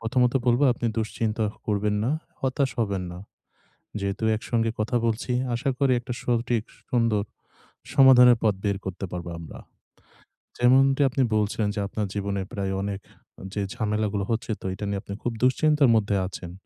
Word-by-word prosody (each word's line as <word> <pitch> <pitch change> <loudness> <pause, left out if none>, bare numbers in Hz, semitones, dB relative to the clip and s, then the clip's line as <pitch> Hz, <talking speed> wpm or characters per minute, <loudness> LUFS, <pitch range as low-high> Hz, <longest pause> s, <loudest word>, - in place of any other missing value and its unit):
প্রথমত, 125 +2 +2
বলব 120 +1 +3
আপনি 120 0 -3
দুশ্চিন্তা 110 0 -1 0.2
করবেন 105 0 0
না। 120 - +1 0.3
হতাশ 130 0 0
হবেন 100 -4 0
না। 90 - -8 0.8
যেহেতু 100 +2 -3
একসঙ্গে 115 +1 -1
কথা 110 +3 -1
বলছি 115 +2 -1 0.2
আশা 120 +3 -1
করি 135 -2 +2
একটা 125 +1 -5
সঠিক 120 -2 0 0.3
সুন্দর 115 -4 +2 0.7
সমাধানের 125 -3 +7
পথ 105 -2 +4
বের 100 -2 0
করতে 95 0 -4
পারব 90 -1 -5
আমরা। 80 -4 -10 1.0
যেমনটি 135 +3 +4
আপনি 130 +1 -1
বলছেন 105 +1 0
যে - - -2
আপনার 105 +1 -3
জীবনে 100 -1 -2
প্রায় 100 -4 -2
অনেক 100 0 -3 0.5
যে 105 - -2
ঝামেলা 110 -2 -1
গুলো 100 -2 -1
হচ্ছে 115 0 -2
তো - - -10
এটা 105 +2 -5
নিয়ে 100 -1 -1
আপনি 100 - -8
খুব 120 - 0
দুশ্চিন্তার 145 +2 +4
মধ্যে 105 -2 +1
আছেন। 90 -2 -8
110 Hz, 160 wpm, -25 LUFS, 100-125 Hz, 1.0 s, সমাধানের